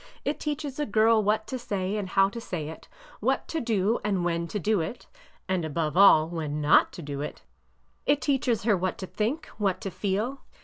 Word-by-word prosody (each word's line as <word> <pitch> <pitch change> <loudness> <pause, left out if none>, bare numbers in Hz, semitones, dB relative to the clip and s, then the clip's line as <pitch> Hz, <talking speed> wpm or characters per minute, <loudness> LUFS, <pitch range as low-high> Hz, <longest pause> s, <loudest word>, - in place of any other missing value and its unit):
It 290 - -1
teaches 295 -2 -4
a 295 - 0
girl 220 +1 +4
what 215 +1 +1
to 260 +2 -4
say 200 -4 -2
and 205 -3 -3
how 195 +1 +4
to 235 +3 -7
say 160 -8 -4
it; 160 - -10 0.3
what - - 0
to 325 - -2
do 220 -1 +1
and 195 -4 0
when 170 -1 -1
to 170 - -3
do 210 +1 +1
it 160 +10 -5 0.4
(and, 185 -2 0
above 155 0 -2
all, 175 -5 +7
when 155 -3 -3
not 150 0 +5
to 170 - -8
do 140 -1 -5
it); 150 - -6 0.6
it 285 0 +4
teaches 255 -6 +1
her 215 -2 +4
what 185 0 -2
to 190 - -5
think, 230 - -2
what 195 -3 +1
to 195 - -4
feel. 210 +9 -2
200 Hz, 210 wpm, -27 LUFS, 170-230 Hz, 0.6 s, all